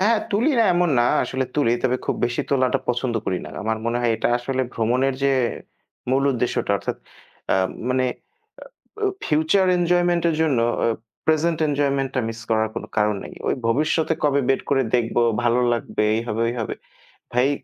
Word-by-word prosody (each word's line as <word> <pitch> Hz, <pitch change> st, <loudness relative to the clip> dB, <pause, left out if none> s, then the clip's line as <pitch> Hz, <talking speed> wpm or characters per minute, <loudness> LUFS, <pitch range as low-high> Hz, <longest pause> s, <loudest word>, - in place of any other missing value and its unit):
হ্যাঁ 220 Hz, +3 st, +3 dB
তুলি 225 Hz, +9 st, +2 dB
না 230 Hz, -, +5 dB
এমন 175 Hz, -1 st, +2 dB
না। 120 Hz, -, +4 dB, 0.2 s
আসলে 130 Hz, 0 st, -2 dB
তুলি, 140 Hz, -6 st, +3 dB
তবে 125 Hz, -1 st, +2 dB
খুব -, -, 0 dB
বেশি 120 Hz, 0 st, -2 dB
তোলাটা 130 Hz, -2 st, +2 dB
পছন্দ 125 Hz, 0 st, 0 dB
করি 90 Hz, -, 0 dB
না। -, -, -9 dB
আমার 110 Hz, +1 st, -1 dB
মনে 115 Hz, +1 st, 0 dB
হয় 120 Hz, -1 st, +1 dB
এটা -, -, 0 dB
আসলে 130 Hz, +2 st, -2 dB
ভ্রমণের 125 Hz, +4 st, +1 dB
যে 140 Hz, -, +3 dB, 0.8 s
মূল 135 Hz, +1 st, +2 dB
উদ্দেশ্যটা, 125 Hz, -1 st, -1 dB
অর্থাৎ -, -, -4 dB, 0.6 s
আ -, -, +4 dB, 0.4 s
মানে 130 Hz, 0 st, +2 dB, 1.0 s
আ -, -, +3 dB
ব -, -, -4 dB
ফিউচার 160 Hz, +6 st, +2 dB
এনজয়মেন্ট 175 Hz, 0 st, +2 dB
এর 160 Hz, -, 0 dB
জন্য 145 Hz, -7 st, +2 dB, 0.3 s
আ -, -, +3 dB, 0.4 s
present 160 Hz, +1 st, +2 dB
এনজয়মেন্টটা 140 Hz, -2 st, 0 dB
মিস 115 Hz, 0 st, -7 dB
করার 110 Hz, -1 st, +2 dB
কোনো -, -, -5 dB
কারণ 105 Hz, 0 st, +2 dB
নাই। -, -, -9 dB, 0.2 s
ঐ -, -, +2 dB, 0.2 s
ভবিষ্যতে 155 Hz, +6 st, +1 dB
কবে 140 Hz, -1 st, +3 dB
বের 135 Hz, -, +2 dB
করে 135 Hz, -1 st, +3 dB
দেখব, 120 Hz, -1 st, -1 dB, 0.3 s
ভালো 120 Hz, +1 st, +3 dB
লাগবে 115 Hz, -2 st, -3 dB
এই 115 Hz, -, 0 dB
হবে 115 Hz, +1 st, -1 dB
ঐ -, -, -2 dB
হবে। 110 Hz, -, -4 dB, 0.6 s
ভাই 125 Hz, +2 st, +3 dB
130 Hz, 180 wpm, -22 LUFS, 120-155 Hz, 1.0 s, না